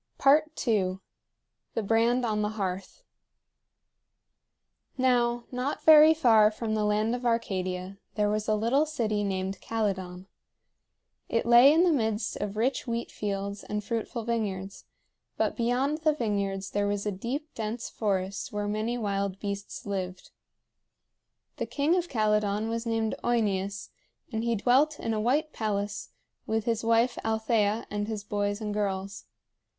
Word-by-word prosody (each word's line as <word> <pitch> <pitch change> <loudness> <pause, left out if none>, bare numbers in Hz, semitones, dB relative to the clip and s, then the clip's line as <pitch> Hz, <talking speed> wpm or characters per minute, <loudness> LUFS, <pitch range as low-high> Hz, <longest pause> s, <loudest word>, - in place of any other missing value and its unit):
II. 260 -10 +3 0.8
THE 225 - 0
BRAND 230 +4 +2
ON 215 -2 0
THE 210 - 0
HEARTH. 195 - -4 1.9
Now, 240 -2 +2
not 255 +3 -3
very 315 0 +8
far 225 -8 +5
from 220 0 -4
the 215 -1 0
land 210 +2 +1
of 245 0 -3
Arcadia 190 -5 -2 0.2
there 210 -1 +2
was 210 0 -1
a 215 - +3
little 245 +8 +2
city 220 -8 -1
named 190 -1 -3
Calydon. 190 -5 -3 1.0
It 230 - 0
lay 240 +4 +8
in 325 +3 +4
the 360 - +4
midst 220 -6 0
of 205 0 -4
rich 255 +4 0
wheat 235 0 -3
fields 200 -1 -4
and 210 0 -4
fruitful 230 +2 -3
vineyards; 200 -4 -3 0.5
but - - 0
beyond 255 +5 0
the 310 -1 +2
vineyards 200 -5 -2
there 205 0 0
was 205 0 -2
a 210 - 0
deep 255 +11 -5
dense 225 +1 -4
forest 195 -2 -2
where 205 0 -2
many 215 +3 -1
wild 200 -3 -2
beasts 200 -1 -5
lived. 185 -2 -4 1.3
The - - -3
king 295 +4 +1
of 355 -1 -1
Calydon 210 -1 +1
was 230 +1 -3
named 225 -1 0
OEneus, 200 -4 0 0.4
and 220 -1 -2
he 235 0 +1
dwelt 265 +8 +3
in 225 - -2
a 215 - -1
white 290 +7 +1
palace 205 -2 -3 0.4
with 220 0 -1
his 230 -1 0
wife 230 +2 +2
Althea 220 -1 +1
and 205 0 -2
his 215 -2 -4
boys 205 0 -2
and 210 -1 -3
girls. 200 -1 -3
215 Hz, 145 wpm, -28 LUFS, 200-240 Hz, 1.9 s, very